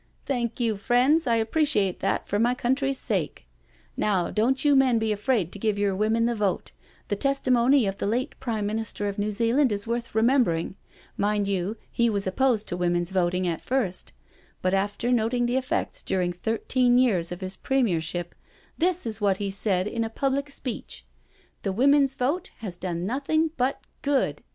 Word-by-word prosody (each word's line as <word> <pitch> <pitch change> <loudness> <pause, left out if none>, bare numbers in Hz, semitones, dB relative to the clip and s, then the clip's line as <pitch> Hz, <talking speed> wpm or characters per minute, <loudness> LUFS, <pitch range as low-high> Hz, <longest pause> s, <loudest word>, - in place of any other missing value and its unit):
" - - -38
Thank 240 -3 -2
you, 225 -4 +1
friends, 255 +9 +3
I 235 - +3
appreciate 225 - +1
that 195 - -1
for 205 - 0
my 240 +2 +2
coun 250 0 +1
try's 270 0 -1
sake. - - -2 0.5
Now 190 -5 +1
don't 255 +6 +1
you 290 -1 +5
men 260 -3 +4
be 220 -1 0
afraid 210 -4 0
to 205 - -9
give 215 -1 0
your 200 -1 +1
women 220 +3 +1
the 240 - +1
vote 205 -4 -1 0.2
— - - -31
the 205 - +1
testimony 260 0 +3
of 195 0 -3
the - - -1
late 240 +5 -1
Prime 220 -5 -2
Minis 220 +1 -3
ter 205 - -3
of 200 0 -4
New 210 +1 0
Zealand 235 +5 +2
is 205 0 -2
worth 235 -1 -3
remembering 220 -8 +2 0.2
— - - -26
^mind 205 0 +1
you, 195 +2 -2
he 235 0 +2
was 200 -2 -1
opposed 220 +2 +1
to - - -2
Women's 175 0 0
Voting 180 0 +1
at 165 -2 -2
first, 230 -9 -1 0.5
but 185 +1 +1
after 205 +5 0
noting 240 +1 +1
the 245 +2 +1
effects 260 -1 -2
during 180 -2 -1
thirteen 245 +5 +1
years 195 -10 +2
of 175 +2 -6
his 185 0 -5
Premier 235 -12 +1
ship 175 +2 -4 0.5
this 360 -1 +1
is 220 -1 -5
what 200 -2 +2
he 200 -1 -3
said 195 -1 +1
in 230 +2 -2
a 225 - -3
public 275 +4 -1
speech 245 - -6 0.3
— - - -35
^The 195 -1 -2
Woman's 275 +2 +4
Vote 320 +10 -1
has 195 -6 -5
done 175 -1 -4
nothing 295 +7 0
but 255 +2 -1 0.2
good. 270 - 0
225 Hz, 195 wpm, -26 LUFS, 195-255 Hz, 0.5 s, you